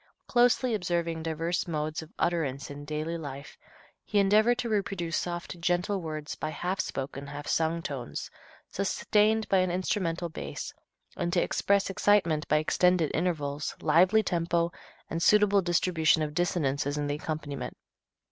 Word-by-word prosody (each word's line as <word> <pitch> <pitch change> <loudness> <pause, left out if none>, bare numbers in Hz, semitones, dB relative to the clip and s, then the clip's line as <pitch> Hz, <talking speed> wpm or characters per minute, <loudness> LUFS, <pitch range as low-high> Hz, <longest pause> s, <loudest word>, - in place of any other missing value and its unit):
Closely 245 0 +3
observing 170 -4 -1
diverse 165 +2 -2
modes 155 -1 -2
of 160 - -12
utterance 145 -6 -1
in 145 +1 -8
daily 155 +3 -3
life, 140 -2 -8 0.5
he 210 - -2
endeavored 215 +4 +4
to 250 - -2
reproduce 195 -6 -1
soft, 175 0 -3
gentle 180 +3 0
words 155 -2 -5
by 155 - -4
half 180 +5 -3
spoken, 140 +1 -4
half 145 +1 -7
sung 165 +1 0
tones, 135 -8 -5 0.4
sustained 210 +2 +2
by 195 - +3
an 185 0 +2
instrumental 175 -1 -1
bass, 70 - -6 0.4
and 175 0 -2
to 175 - +3
express 200 0 +1
excitement 180 -6 +2
by 150 - +3
extended 175 +1 +2
intervals, 150 -4 -1
lively 185 +8 +4
tempo 170 -2 0 0.4
and 165 - -3
suitable 205 +1 +5
distribution 170 -2 +2
of 150 -1 -3
dissonances 145 -5 0
in 145 - -1
the 145 - -1
accompaniment. 150 -2 -5
170 Hz, 145 wpm, -29 LUFS, 150-185 Hz, 0.5 s, suitable